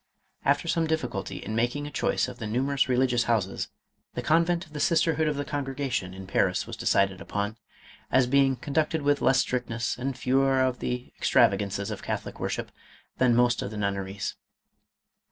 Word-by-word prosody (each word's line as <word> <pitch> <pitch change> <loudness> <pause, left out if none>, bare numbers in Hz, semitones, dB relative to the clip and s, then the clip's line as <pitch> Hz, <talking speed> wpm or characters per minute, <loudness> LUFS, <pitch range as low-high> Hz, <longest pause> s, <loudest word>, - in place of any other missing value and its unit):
After 145 +4 +2
some 165 -1 +1
difficulty 120 - -2
in 110 - -5
making 120 +6 0
a 145 - -6
choice - - 0
of 125 -1 -9
the 110 - -4
nu 120 +5 0
merous 140 0 +1
religious 125 -1 +2
houses, 105 -5 0 0.5
the - - -3
convent 170 +2 +2
of 155 - -20
the 150 - -5
sisterhood 160 0 +2
of 150 - 0
the 145 0 -3
Congregation 135 -9 -3
in 95 0 -8
Paris, 95 -1 +1
was - - -7
decided 95 -1 +1
upon, 105 +1 -3 0.5
as 130 -1 +4
be 140 +2 +4
ing 135 -1 +2
conducted 150 +4 -1
with 145 0 +2
less 130 +1 +4
strictness 120 -2 -1
and 130 0 -3
fewer 135 +1 +2
of 130 -1 +1
the 125 0 -4
ex - - -1
travagances 100 0 +2
of - - -5
Catholic - - -4
worship - - -3 0.5
than 125 -2 +4
most 120 0 +3
of - - -3
the 105 - -7
nun 100 -1 0
neries. 100 +1 -4
125 Hz, 190 wpm, -27 LUFS, 110-145 Hz, 0.5 s, as